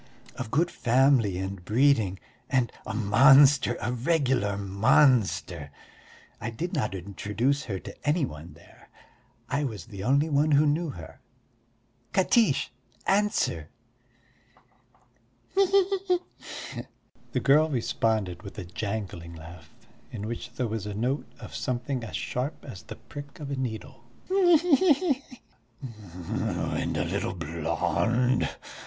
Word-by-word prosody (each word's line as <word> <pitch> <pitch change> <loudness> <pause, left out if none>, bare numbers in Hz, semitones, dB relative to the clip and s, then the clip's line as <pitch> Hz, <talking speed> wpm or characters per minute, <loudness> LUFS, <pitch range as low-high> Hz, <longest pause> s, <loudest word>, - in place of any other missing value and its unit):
Of 125 -3 -5
good 165 +8 +1
family 125 -5 +3
and 95 -1 -5
breeding 110 -3 +3 0.3
and 125 -5 +1 0.2
a 110 - -4
monster, 130 +4 +6
a 120 +4 -2
regular 125 -7 +1
monster! 95 - +2 0.7
I - - -3
did 170 +11 -4
not 115 - -1
introduce 105 - -1
her 100 -4 -3
to - - -9
any 150 +1 +2
one 80 - -10
there, - - -19 0.6
I 140 +3 -1
was 115 -7 -4
the 100 -5 -8
only 140 +6 +3
one 150 0 +2
who 145 +2 +5
knew 155 +3 +1
her.... 80 - -10 0.9
Katiche, 195 - +3 0.3
answer!" 195 - +1 1.8
"He 390 0 +4
he 390 +1 +3
he!" 365 -1 +4 1.2
the - - +1
girl 150 +3 +4
responded 110 - -1
with 100 - -10
a 100 - -5
jangling 95 -3 -5
laugh, 85 +1 -12 0.4
in 105 -3 -5
which 115 +1 -6
there 125 - -2
was 110 -2 -4
a 105 - -5
note 125 +7 -1
of - - -10
something 125 0 -2
as 105 -9 -6
sharp 125 - -3
as 95 - -8
the - - -9
prick 145 0 -11
of 145 -2 -6
a - - -1
needle. 120 -3 -5 0.2
"He 365 -3 +5
he 345 +1 +4 0.2
he!" 270 +2 -13 1.0
"And - - -2
a - - 0
little - - -2
blonde?" 115 - 0
120 Hz, 130 wpm, -27 LUFS, 100-145 Hz, 1.8 s, monster